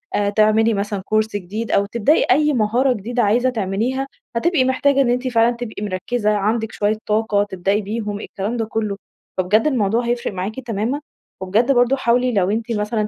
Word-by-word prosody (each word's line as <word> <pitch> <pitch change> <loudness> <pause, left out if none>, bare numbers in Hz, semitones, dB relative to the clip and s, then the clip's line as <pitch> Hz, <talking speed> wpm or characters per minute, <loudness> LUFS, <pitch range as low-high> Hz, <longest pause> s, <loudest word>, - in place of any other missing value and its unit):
آآ، 205 -1 +1
تعملي 215 +2 +3
مثلًا 205 0 -2 0.2
course 215 0 +3
جديد 205 +4 -4
أو 200 - +3
تبدئي 235 +8 +2
أيّ 300 +3 +3
مهارة 245 +3 +2
جديدة 240 +3 -2
عايزة 240 +5 +2
تعمليها، 235 +5 -2 0.3
هتبقي 305 +2 +2
محتاجة 275 +2 +2
إنّ 255 - +2
أنتِ 250 +2 0
فعلًا 240 -1 +2
تبقي 235 -3 -6
مركزة، 210 +3 -1
عندِك 215 +2 0
شوية 210 0 0
طاقة 210 -1 +1
تبدئي 195 +1 -1
بيهم، 210 0 -4
الكلام 210 +3 -4
ده 225 - -1
كله. 215 -2 -3 0.4
فبجد 205 +7 +2
الموضوع 235 -4 +1
هيفرق 240 -2 -2
معاكِ 195 +6 -4
تمامًا، 240 +3 -2 0.4
وبجد 215 +8 +2
برضه 245 0 +3
حاولي 250 -1 +1
لو 195 -3 +2
أنتِ 225 +2 -2
مثلًا 210 0 -1
220 Hz, 175 wpm, -20 LUFS, 205-245 Hz, 0.4 s, تعملي